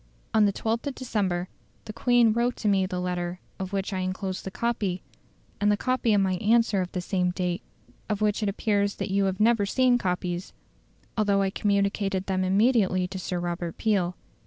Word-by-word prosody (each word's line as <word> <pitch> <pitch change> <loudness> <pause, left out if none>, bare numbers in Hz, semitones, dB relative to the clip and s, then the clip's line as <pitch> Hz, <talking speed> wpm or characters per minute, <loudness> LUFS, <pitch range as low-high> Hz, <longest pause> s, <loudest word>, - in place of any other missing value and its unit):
On 215 -1 +5
the 200 - +3
12th 225 +6 -2
of 275 - -3
December 190 -8 -1 0.4
the 215 - -7
Queen 240 -1 +4
wrote 240 +2 +1
to 215 - -3
me 195 -2 +3
the 180 -1 -3
letter 180 0 -3 0.2
of 190 0 -4
which 195 +1 -2
I 190 - -1
enclose 185 0 -3
the - - -5
copy, 205 -4 -2 0.6
and 205 0 +3
the 205 - +2
copy 255 0 +1
of 200 - +4
my 190 -1 +1
answer 220 -1 +3
of 180 - -4
the 180 - -2
same 180 0 0
date; 180 -1 -2 0.5
of 210 -1 0
which 210 0 +1
it 210 - +1
appears 200 0 0
that - - -4
you 200 0 +2
have 190 -1 -1
never 215 -2 +3
seen 250 +2 +3
copies, 180 -2 -2 0.6
although 200 -2 +2
I 195 - 0
communicated 200 -1 0
them 185 -1 0
immediately 190 -2 +3
to 190 0 -5
Sir 180 -1 -3
Robert 175 -1 -3
Peel. 190 -5 +1
195 Hz, 195 wpm, -26 LUFS, 185-215 Hz, 0.6 s, On